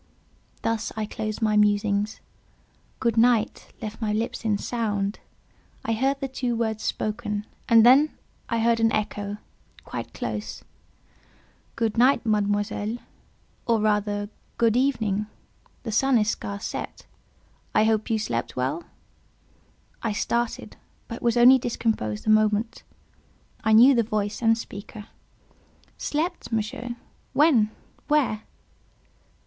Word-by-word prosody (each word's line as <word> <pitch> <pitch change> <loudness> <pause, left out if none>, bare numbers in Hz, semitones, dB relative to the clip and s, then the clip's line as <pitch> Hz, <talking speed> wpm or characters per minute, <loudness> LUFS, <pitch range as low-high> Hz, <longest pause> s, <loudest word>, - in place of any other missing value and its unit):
Thus 225 -1 -1
I 215 - -1
closed 215 +1 -4
my 215 -1 +2
musings. 205 0 +2 0.8
"Good 235 -2 0
night" 230 -1 +2
left 220 +2 -6
my 215 -1 0
lips 225 +3 -2
in 215 -2 +1
sound; 205 -3 -2 0.7
I 225 - +1
heard 265 +5 +1
the 260 -3 -2
words 220 -2 -1
spoken, 210 -1 -2 0.2
and 230 -1 +7
then 275 +5 +6 0.3
I 230 -1 0
heard 230 0 +3
an 225 0 +3
echo—quite 205 -1 -6
close. - - -5 1.1
"Good 225 -1 0
night, 255 +2 +4
Mademoiselle; 205 +1 0 0.7
or, 230 -2 +3
rather, 205 -1 0 0.3
good 230 -1 +3
evening—the 220 -2 -3
sun 265 +4 +3
is 215 0 +2
scarce 200 +1 -5
set; - - -6 0.7
I 215 - +5
hope 220 -1 +1
you 225 - +2
slept 120 - -3
well?" 135 +6 -1 1.2
I 225 -2 -1
started, 235 +3 -2 0.3
but 230 - -7
was 235 0 +1
only 255 +2 +8
discomposed 220 - -2
a 215 - +4
moment; 215 +1 +2 0.8
I 220 - +2
knew 245 +5 +8
the 235 - +3
voice 210 -1 -2
and 225 -1 +4
speaker. 210 -1 -9 0.9
"Slept, 330 +2 -2
Monsieur! 240 +2 -3 0.4
When? 270 -8 +4 0.4
where?" 285 -8 +2
220 Hz, 120 wpm, -25 LUFS, 210-235 Hz, 1.2 s, only